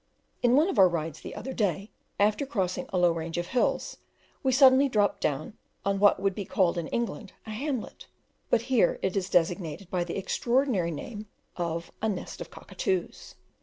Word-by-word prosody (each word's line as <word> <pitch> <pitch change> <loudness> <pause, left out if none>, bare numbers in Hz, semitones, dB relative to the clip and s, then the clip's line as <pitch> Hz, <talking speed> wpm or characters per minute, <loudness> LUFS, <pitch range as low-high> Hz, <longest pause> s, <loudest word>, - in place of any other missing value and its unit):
In 245 +1 +4
one 305 +5 +5
of 385 - -1
our 185 -1 +8
rides 165 -3 -4
the - - -8
other 265 - -5
day, 200 -2 -1 0.3
after 210 +5 +3
crossing 195 -10 -2
a 190 - -2
low 175 -1 +4
range 165 0 -4
of 175 - -1
hills, 250 - 0 0.4
we 265 - +2
suddenly 265 +1 +6
dropped 210 -4 +1
down 150 +6 -1 0.3
on 200 0 +1
what 205 -1 +5
would 195 0 +1
be 200 - -4
called 180 -2 +1
in 165 - -4
England 225 -3 -3
a 220 - -7
hamlet, 255 +2 -4 0.4
but 230 - +3
here 240 -7 +2
it 190 0 0
is 195 -1 -1
designated 175 0 0
by 180 -2 +1
the 175 - -5
extraordinary 235 -2 +1
name 210 - -6 0.3
of 170 -1 -3
a 220 - +1
"nest 195 -4 -5
of - - -6
cockatoos." 380 -2 -4
200 Hz, 185 wpm, -28 LUFS, 175-240 Hz, 0.4 s, our